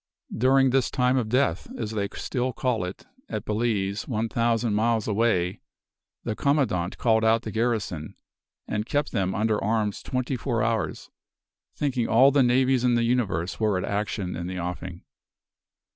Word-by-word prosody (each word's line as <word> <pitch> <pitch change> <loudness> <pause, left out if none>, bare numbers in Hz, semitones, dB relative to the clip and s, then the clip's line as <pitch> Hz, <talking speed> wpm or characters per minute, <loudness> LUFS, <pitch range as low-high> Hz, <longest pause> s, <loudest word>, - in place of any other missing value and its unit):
"During 130 +2 +4
this 130 -1 +2
time 125 0 +2
of 120 -4 0
death, 125 -8 +1
as 110 -2 -3
they 100 -2 -2
still 125 0 -2
call 120 -6 -1
it, 90 +1 -7 0.2
at - - -4
Balize, 105 -2 -1
one 115 -2 -1
thousand 115 -1 +1
miles 110 +1 +1
away, 100 -5 +1 0.6
the 110 - -2
commandant 130 - 0
called 110 -2 +2
out 110 0 +3
the 110 - -5
garrison, 110 -9 -2 0.5
and 105 +2 -2
kept 145 0 0
them 95 -1 -1
under 110 0 0
arms 105 -1 0
twenty 130 +1 -2
four 115 -2 -1
hours, 115 0 -2 0.6
thinking 130 -5 -1
all 130 +5 +6
the 140 0 +4
navies 130 0 +3
in 125 -1 +3
the 120 - +2
universe 105 -8 0
were 105 -3 +2
at 90 - -2
action 100 -2 -2
in 85 +1 -4
the 95 0 -5
offing. 90 0 -5
115 Hz, 160 wpm, -25 LUFS, 100-125 Hz, 0.6 s, all